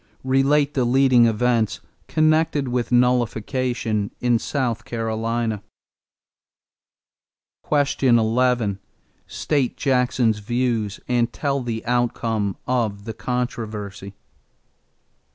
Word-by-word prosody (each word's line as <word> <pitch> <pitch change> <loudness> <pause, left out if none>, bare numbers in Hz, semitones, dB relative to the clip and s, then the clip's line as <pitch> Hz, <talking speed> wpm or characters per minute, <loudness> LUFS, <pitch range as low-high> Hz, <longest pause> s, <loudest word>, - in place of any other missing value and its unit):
Relate 140 +2 +2
the 130 - +1
leading 125 -1 +4
events 115 -1 +1 0.3
connected 155 -1 +2
with 120 0 -2
nullification 120 -2 0
in 120 -2 +2
South 125 -4 -2
Carolina. 115 -1 -2 2.1
11. 125 -6 +2 0.5
State 140 -5 -1
Jackson's 125 -4 +1
views 115 -2 -1
and 120 -1 +1
tell 140 -2 -1
the 115 -2 -4
outcome 115 -4 -1
of 110 -5 -1
the 110 - -5
controversy. 110 -5 -4
120 Hz, 80 wpm, -22 LUFS, 110-130 Hz, 2.1 s, leading